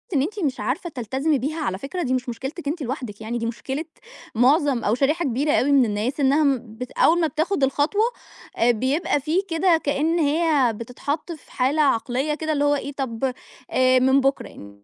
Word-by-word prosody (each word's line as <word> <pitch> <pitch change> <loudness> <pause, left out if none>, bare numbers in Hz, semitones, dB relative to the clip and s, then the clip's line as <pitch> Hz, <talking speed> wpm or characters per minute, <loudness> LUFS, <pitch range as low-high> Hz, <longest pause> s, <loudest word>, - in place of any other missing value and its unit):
إن 265 - +3
أنتِ 405 +8 -3
مش 280 -7 -1
عارفة 340 +7 -2
تلتزمي 270 +3 -1
بيها 310 +6 -3
على 190 -11 -2
فكرة 330 - -4
دي 255 -1 -1
مش 255 0 -2
مشكلتِك 270 +7 -6
أنتِ 315 +2 -2
لوحدِك، 245 -5 -5
يعني 230 +2 -3
دي 230 - -3
مشكلة 265 +6 -4 0.5
معظم 265 +1 +3
أو 215 +3 +2
شريحة 300 +6 +1
كبيرة 275 +4 0
أوي 285 0 +2
من 270 -3 +5
الناس، 220 +7 -2
إنّها 285 +3 +3
م 250 -6 -1
بت 250 0 -6
أوّل 340 +2 +3
ما 325 - +2
بتاخد 315 +1 -1
الخطوة، 290 +10 +1 0.6
آآ، 240 +1 +4
بيبقى 265 +7 0
فيه 320 +6 +1
كده 330 0 +2
كأن 310 +4 +1
هي 295 -5 +2
بتتحط 280 +9 -5
في 310 -5 -11
حالة 275 +5 +1
عقليّة 270 +2 +1
كده 315 0 -3
اللي 290 0 0
هو 290 0 +3
إيه 280 0 -4
طَب 260 -1 -2 0.4
آآ، 255 0 +4
من 265 +2 +4
بُكرة، 100 - -3
275 Hz, 195 wpm, -23 LUFS, 250-310 Hz, 0.6 s, من